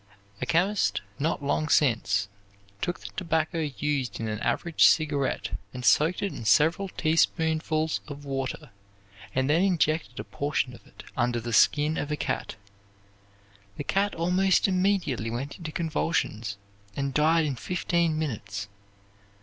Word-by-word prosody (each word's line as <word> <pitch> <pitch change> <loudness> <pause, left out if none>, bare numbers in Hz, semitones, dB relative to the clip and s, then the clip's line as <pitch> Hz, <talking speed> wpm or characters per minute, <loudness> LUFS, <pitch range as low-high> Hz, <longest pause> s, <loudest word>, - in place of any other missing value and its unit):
A - - -2
chemist, 190 +5 +2 0.2
not 150 0 -1
long 150 +2 0
since, 115 -7 +2 0.5
took 175 - -2
the - - -8
tobacco 165 -2 0
used 145 -3 -2
in 115 - -3
an 105 -1 -3
average 165 +7 +2
cigarette 145 -4 +2 0.2
and 125 -1 -5
soaked 155 - +4
it 200 - -1
in - - -7
several 165 - +3
teaspoonfuls 160 -1 +1
of 145 -1 -8
water 135 0 -4 0.6
and 130 0 +2
then 155 +4 +3
injected 165 -4 +1
a - - -3
portion 140 -3 -2
of - - -15
it - - -14
under 120 -2 +1
the 115 0 -5
skin 150 +6 +4
of 145 - -3
a 150 - -1
cat. - - -3 1.2
The - - -3
cat 200 +6 0
almost 180 +4 +3
immediately 185 - +1
went 130 +8 -5
into 160 -3 -6
convulsions, 135 -10 -1 0.4
and 140 -1 -2
died 160 +2 +3
in 140 -3 -1
fifteen 170 +1 0
minutes. 100 -9 -4
150 Hz, 140 wpm, -27 LUFS, 130-165 Hz, 1.2 s, soaked